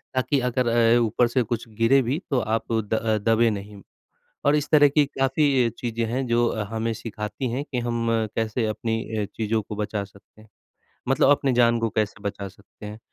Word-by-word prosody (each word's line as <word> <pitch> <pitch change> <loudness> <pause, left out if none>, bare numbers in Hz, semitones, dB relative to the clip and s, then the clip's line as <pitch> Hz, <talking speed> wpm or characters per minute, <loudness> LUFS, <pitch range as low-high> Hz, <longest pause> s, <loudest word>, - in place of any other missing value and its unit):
ताकि 135 +2 +1
अगर 125 0 0
अ, 115 0 +4
ऊपर 120 +1 +2
से 125 +1 +1
कुछ 115 +1 -4
गिरे 130 +4 +5
भी 130 +5 -1
तो 135 -3 +2
आप 115 +1 -2
द 110 0 0
दबे 115 +1 +4
नहीं 100 -1 -6 0.6
और 145 +1 +4
इस 145 - -1
तरह 145 -2 +6
की 145 +1 +3
काफ़ी 135 -2 +1
चीज़ें 115 -1 -2
हैं 130 +1 -1
जो 120 0 +2 0.2
हमें 115 0 -2
सिखाती 110 +3 -5
हैं 135 +5 -3
के 130 -4 -5
हम 115 -1 -1 0.3
कैसे 110 +1 -1
अपनी 115 +1 -2
अ, 105 - 0
चीज़ों 110 +1 -2
को 105 - -8
बचा 105 -1 -3
सकते 100 +2 -20
हैं, 110 - -20 0.6
मतलब 135 0 +3
अपनी 140 -2 +2
जान 120 -1 +3
को 115 - +1
कैसे 105 -1 -2
बचा 100 -1 -4
सकते 105 +2 -15
हैं। 105 +1 -8
115 Hz, 190 wpm, -24 LUFS, 110-125 Hz, 0.6 s, तरह